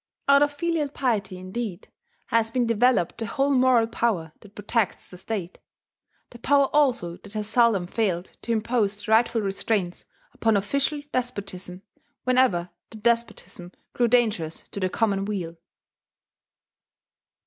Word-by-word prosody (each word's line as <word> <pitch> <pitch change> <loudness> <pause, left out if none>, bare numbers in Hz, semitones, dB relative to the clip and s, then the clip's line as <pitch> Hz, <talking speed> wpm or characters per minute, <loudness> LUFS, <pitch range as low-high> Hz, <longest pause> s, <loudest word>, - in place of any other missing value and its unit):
Out 280 0 +6
of 290 0 +3
filial 310 0 -1
piety 220 -9 -1
indeed 185 +1 -5 0.4
has 225 -1 +2
been 245 +1 0
developed 230 -5 +2
the 225 - -2
whole 275 +4 0
moral 255 -3 +4
power 225 -8 -1
that 205 -1 -17
protects 210 0 -2
the 180 - -10
state, 190 -3 -5 0.7
the 240 - -12
power 280 +2 +3
also 245 -13 +2
that 205 - -14
has 210 -1 -3
seldom 220 -5 +3
failed 185 -3 -2
to 235 - -4
impose 220 -2 0
the - - -3
rightful 225 0 +3
restraints 195 -2 -2 0.3
upon 225 -2 +2
official 280 +8 -1
despotism 200 -7 -4 0.4
whenever 250 -9 +2 0.2
that 220 -2 -12
despotism 225 -6 -1 0.2
grew 240 - +2
dangerous 215 -10 0
to - - -6
the 185 -1 0
common 200 -1 0
weal. 185 -5 -4
225 Hz, 135 wpm, -25 LUFS, 195-245 Hz, 0.7 s, Out